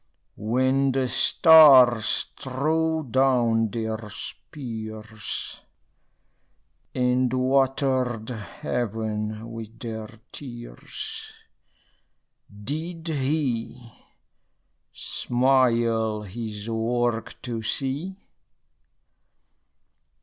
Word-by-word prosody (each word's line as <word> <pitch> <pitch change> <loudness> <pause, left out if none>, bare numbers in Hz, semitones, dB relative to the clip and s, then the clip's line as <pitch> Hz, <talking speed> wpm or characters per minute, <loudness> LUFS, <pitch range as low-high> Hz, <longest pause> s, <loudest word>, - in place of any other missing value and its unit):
When 130 +4 +1
the 130 -1 +1
stars 130 -7 +6
threw 155 +3 0
down 120 -4 +3
their 110 0 -3
spears, 110 -2 -6 1.3
And 125 0 +2
watered 130 -3 +1
heaven 110 -2 -4
with 115 0 -8
their 110 -2 -6 0.2
tears, 120 - -8 1.3
Did 165 +6 -4
he 130 -5 -2 1.0
smile 120 -4 +1
his 105 +1 -6
work 115 0 -1
to 120 -3 -4
see? 140 +11 -2
120 Hz, 60 wpm, -25 LUFS, 110-135 Hz, 1.3 s, stars